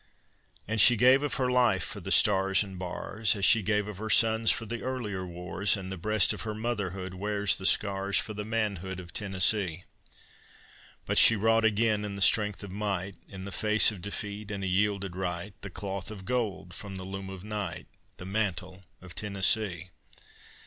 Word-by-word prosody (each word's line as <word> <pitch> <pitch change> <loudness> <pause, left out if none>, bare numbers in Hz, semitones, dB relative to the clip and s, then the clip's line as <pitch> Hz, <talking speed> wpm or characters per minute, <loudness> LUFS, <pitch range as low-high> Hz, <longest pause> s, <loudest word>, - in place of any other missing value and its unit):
And 110 0 +2
she 120 - +8
gave 130 +4 +5
of 145 - -2
her 125 -1 0
life 120 -7 +2
for - - -5
the - - -7
stars 95 -1 +4
and 95 -2 -10
bars, 100 +4 -2
As 100 -1 +1
she 115 - +6
gave 105 0 0
of 105 -3 -8
her 110 0 -5
sons 110 +1 +4
for 115 - +1
the 115 +2 -5
earlier 105 -8 -4
wars, 90 +4 0
And 95 -1 -7
the - - -4
breast 110 +4 +2
of - - -7
her 110 -1 -5
motherhood 100 -5 -4
wears 100 +1 +1
the 95 - -1
scars, 100 -1 +2
For 110 - -1
the 105 0 -5
manhood 100 -4 -3
of 85 -1 -11
Tennessee. 95 -3 0 1.2
But - - +3
she 115 - +7
wrought 115 +2 +2
again, 110 -1 +1
in 100 -1 -5
the 100 - -7
strength 105 -1 +3
of 100 - -8
might, 100 -1 -3 0.2
In 95 -1 -9
the 100 - -7
face 110 +2 +3
of 100 -4 -10
defeat 100 +2 -5
and 100 -2 -5
a - - -1
yielded 100 -1 0
right, 90 +1 -4
The 100 - -6
Cloth 95 +1 -5
of 100 -3 -9
Gold 100 -7 -3
from 100 -2 -8
the 95 - -7
loom 95 0 -7
of 95 -1 -9
night, 105 -1 -5 0.3
The 90 - -9
mantle 95 -2 -3 0.2
of 95 -2 -10
Tennessee. 100 -3 0
100 Hz, 190 wpm, -28 LUFS, 95-110 Hz, 1.2 s, she